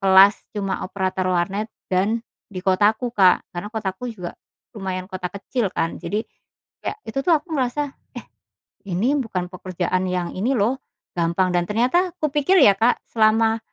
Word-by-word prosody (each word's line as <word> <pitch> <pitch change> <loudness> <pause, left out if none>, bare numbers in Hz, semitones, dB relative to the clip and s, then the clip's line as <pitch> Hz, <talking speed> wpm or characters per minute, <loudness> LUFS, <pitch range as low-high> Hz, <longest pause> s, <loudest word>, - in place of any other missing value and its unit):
kelas 195 +1 +6 0.2
cuma 195 -2 -2
operator 185 -1 -1
warnet 190 +5 0 0.2
dan 215 +5 +1 0.2
di 185 -2 -7
kotaku 210 +5 +2
Kak. 185 -5 +5
Karena 175 +4 -5
kotaku 215 +1 -4
juga, 185 -7 -6 0.4
lumayan 190 -4 -4
kota 185 -1 -5
kecil 200 +4 -2
kan, 165 -1 -2
jadi, 215 +2 -2 0.6
kayak - - -1
itu 220 - -3
tuh 345 - +6
aku 315 +3 -2
merasa, 270 +3 -1
eh, - - -25 1.0
ini 250 +11 +2
bukan 190 -8 -2
pekerjaan 185 0 -2
yang 180 -1 -1
ini 220 +8 0
loh, 240 +3 +1 0.4
gampang 170 +2 +1
dan 175 0 +2
ternyata 255 - +2
kupikir 300 +4 +2
ya 200 - +7
Kak 235 +3 +3
selama, 225 0 +3
200 Hz, 155 wpm, -22 LUFS, 185-235 Hz, 1.0 s, ya